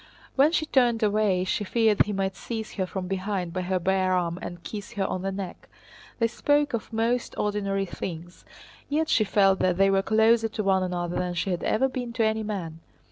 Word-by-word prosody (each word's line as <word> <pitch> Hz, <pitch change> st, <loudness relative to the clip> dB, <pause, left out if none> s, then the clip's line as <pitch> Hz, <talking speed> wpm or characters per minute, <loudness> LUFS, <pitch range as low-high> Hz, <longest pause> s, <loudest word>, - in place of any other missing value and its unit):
When 280 Hz, +3 st, +5 dB
she 315 Hz, -2 st, +1 dB
turned 245 Hz, -6 st, +2 dB
away 205 Hz, -3 st, +2 dB
she 190 Hz, +2 st, -1 dB
feared 220 Hz, 0 st, +3 dB
he -, -, -2 dB
might 195 Hz, -1 st, -1 dB
seize 220 Hz, 0 st, -5 dB
her 190 Hz, -2 st, -2 dB
from 185 Hz, 0 st, -4 dB
behind 190 Hz, -2 st, -2 dB
by 185 Hz, -, -2 dB
her 185 Hz, +1 st, 0 dB
bare 185 Hz, +1 st, +1 dB
arm 175 Hz, -1 st, 0 dB
and 175 Hz, -1 st, -7 dB
kiss 210 Hz, +2 st, -7 dB
her 200 Hz, -3 st, -1 dB
on 185 Hz, -, -2 dB
the 195 Hz, +1 st, -2 dB
neck. 190 Hz, -2 st, -7 dB, 0.5 s
They 230 Hz, -, +2 dB
spoke 290 Hz, +5 st, +1 dB
of 230 Hz, -1 st, -3 dB
most 230 Hz, +2 st, 0 dB
ordinary 200 Hz, -1 st, -1 dB
things, 175 Hz, -1 st, -7 dB, 0.5 s
yet 310 Hz, +2 st, 0 dB
she 220 Hz, -, +4 dB
felt 195 Hz, -1 st, +3 dB
that 180 Hz, -1 st, +1 dB
they 195 Hz, 0 st, +4 dB
were 195 Hz, 0 st, +3 dB
closer 220 Hz, +2 st, +3 dB
to 215 Hz, -1 st, -4 dB
one 190 Hz, -1 st, +3 dB
another 175 Hz, -1 st, -2 dB
than 180 Hz, -1 st, -2 dB
she 185 Hz, +2 st, -1 dB
had 175 Hz, -, -2 dB
ever 265 Hz, +5 st, +2 dB
been 250 Hz, -2 st, -5 dB
to 230 Hz, -2 st, +1 dB
any 220 Hz, 0 st, +1 dB
man. 185 Hz, -7 st, -5 dB
195 Hz, 210 wpm, -26 LUFS, 185-225 Hz, 0.5 s, When